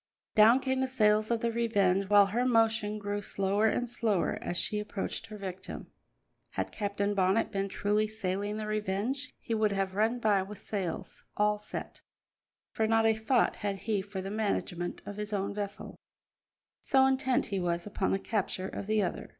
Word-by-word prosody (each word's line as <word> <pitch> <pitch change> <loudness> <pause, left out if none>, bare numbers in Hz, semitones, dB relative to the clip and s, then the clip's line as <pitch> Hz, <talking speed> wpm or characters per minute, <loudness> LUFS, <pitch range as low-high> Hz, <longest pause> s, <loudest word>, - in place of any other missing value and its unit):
Down 225 +4 +7
came 260 0 -1
the 265 - +1
sails 215 -4 +3
of 230 -1 0
the 235 - +1
Revenge, 200 -5 +1
while 205 -1 +7
her 225 +6 0
motion 225 -3 +2
grew 205 0 -3
slower 200 +2 +1
and 245 +3 0
slower 220 -6 0
as 175 - -2
she 210 - +1
approached 210 +1 -4
her 215 -1 -8
victim. 190 -2 -7 0.6
Had - - -2
Captain 200 -1 -1
Bonnet 195 +2 +2
been 195 0 -1
truly 210 +2 +1
sailing 205 -1 -3
the 215 - -3
Revenge, 215 +7 -2
he 230 - -4
would 215 -1 +2
have 195 -1 -1
run 220 +4 +1
by 210 -4 +3
with 200 +2 -7
sails 195 -5 -5
all 210 0 +2
set, 210 - -7 0.7
for 220 - 0
not 225 0 +3
a 225 - +5
thought 220 +3 +1
had 200 -2 -3
he 215 -3 +1
for 190 -1 -6
the 195 - -5
management 195 -5 -2
of 205 - -7
his 210 0 -4
own 200 0 -1
vessel, 205 0 -5 0.9
so 265 -1 +4
intent 265 -1 +2
he 195 - +1
was 170 -1 -1
upon 205 -2 -1
the - - +2
capture 195 -2 -2
of 200 - -6
the 215 -1 +2
other. 180 - -4
210 Hz, 180 wpm, -30 LUFS, 195-225 Hz, 0.9 s, Down